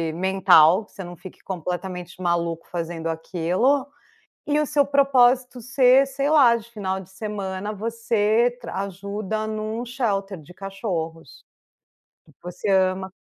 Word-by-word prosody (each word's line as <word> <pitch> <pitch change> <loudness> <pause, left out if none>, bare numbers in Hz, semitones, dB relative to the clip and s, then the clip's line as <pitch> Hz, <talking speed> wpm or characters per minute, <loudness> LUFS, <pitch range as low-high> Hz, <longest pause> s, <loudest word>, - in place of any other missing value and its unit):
mental, 190 0 +5
que - - -27
você 195 - -7
não 175 -1 -9
fique 185 - -12
completamente 180 0 -5
maluco 170 -1 -1
fazendo 165 -1 -4
aquilo. 180 - 0 0.6
E 295 0 +1
o - - 0
seu 285 0 +2
propósito 260 -3 +3
ser, 265 +1 +4
sei 275 +1 -2
lá, 265 -7 +6
de 230 0 -7
final 190 -3 -3
de 185 - -15
semana 200 0 -5
você 230 +2 0
ajuda 200 +2 -4
em 215 0 -4
um 220 +3 -4
shelter 205 - -2
de 180 +4 -15
cachorros. 175 - -6 0.8
E - - -21
que - - -34
você 180 +3 -5
ama. 190 0 +1
200 Hz, 140 wpm, -23 LUFS, 180-240 Hz, 0.8 s, lá